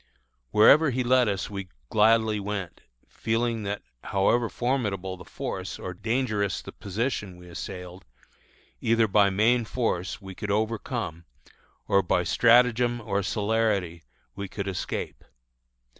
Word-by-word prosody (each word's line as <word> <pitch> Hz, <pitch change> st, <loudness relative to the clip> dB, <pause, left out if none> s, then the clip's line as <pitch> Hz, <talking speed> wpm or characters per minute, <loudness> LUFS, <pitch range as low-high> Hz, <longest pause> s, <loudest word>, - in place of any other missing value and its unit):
Wherever 140 Hz, -, +6 dB
he 130 Hz, 0 st, 0 dB
led 125 Hz, 0 st, +4 dB
us 100 Hz, -2 st, -2 dB
we 100 Hz, -2 st, -6 dB, 0.2 s
gladly 110 Hz, 0 st, +4 dB
went, 100 Hz, -3 st, -5 dB, 0.3 s
feeling 115 Hz, 0 st, -1 dB
that 100 Hz, +1 st, -3 dB, 0.2 s
however 110 Hz, +4 st, +2 dB
formidable 100 Hz, -8 st, -1 dB
the 90 Hz, -, -12 dB
force -, -, -5 dB
or 90 Hz, -, -6 dB
dangerous 110 Hz, -1 st, -1 dB
the -, -, -8 dB
position 100 Hz, -2 st, -3 dB
we 90 Hz, 0 st, -14 dB
assailed, 90 Hz, +1 st, -8 dB, 0.8 s
either 115 Hz, 0 st, +3 dB
by 100 Hz, 0 st, +4 dB
main 115 Hz, +5 st, +3 dB
force 105 Hz, -6 st, -2 dB
we 95 Hz, -2 st, -9 dB
could 105 Hz, +2 st, -6 dB
overcome, 110 Hz, -, -2 dB, 0.6 s
or 100 Hz, 0 st, +4 dB
by 90 Hz, -1 st, +1 dB
stratagem 120 Hz, +3 st, +4 dB
or 100 Hz, -3 st, -1 dB
celerity 100 Hz, -4 st, 0 dB, 0.3 s
we 100 Hz, 0 st, -5 dB
could 100 Hz, 0 st, -5 dB
escape. 95 Hz, -, -4 dB
105 Hz, 130 wpm, -26 LUFS, 95-115 Hz, 0.8 s, Wherever